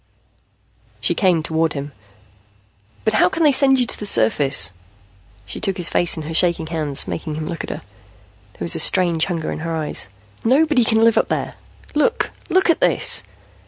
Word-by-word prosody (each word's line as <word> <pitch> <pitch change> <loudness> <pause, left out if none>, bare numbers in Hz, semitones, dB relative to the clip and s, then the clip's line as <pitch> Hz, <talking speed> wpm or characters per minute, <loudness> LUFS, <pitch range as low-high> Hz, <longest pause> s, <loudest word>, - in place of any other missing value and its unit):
She - - -1
came 180 -6 +1
toward 160 0 -1
him. 145 0 -6 1.1
"But 220 - +1
how 200 -4 +3
can 330 - -2
they 300 - +5
send 270 -1 +3
you 250 - +3
to - - -3
the 210 - -2
surface?" 135 - +3 0.7
She 100 - -6
took 195 -2 0
his 175 -2 -3
face 175 - +2
in 160 - -5
her 160 +2 -6
shaking 170 -1 +2
hands, 155 -4 0
making 155 -2 -5
him 155 0 -5
look 165 - -5
at - - -8
her. - - -7 0.7
There 85 - -7
was 85 - -2
a - - -3
strange 170 -4 +2
hunger 165 -4 -4
in - - -5
her 165 +1 -4
eyes. 150 - -3 0.4
"Nobody 270 +2 +2
can 220 0 +1
live 230 -1 +4
up - - -1
there. - - -3 0.4
Look, 300 0 0 0.2
look 375 +1 +2
at - - -2
this!" - - +4
170 Hz, 190 wpm, -19 LUFS, 155-225 Hz, 1.1 s, they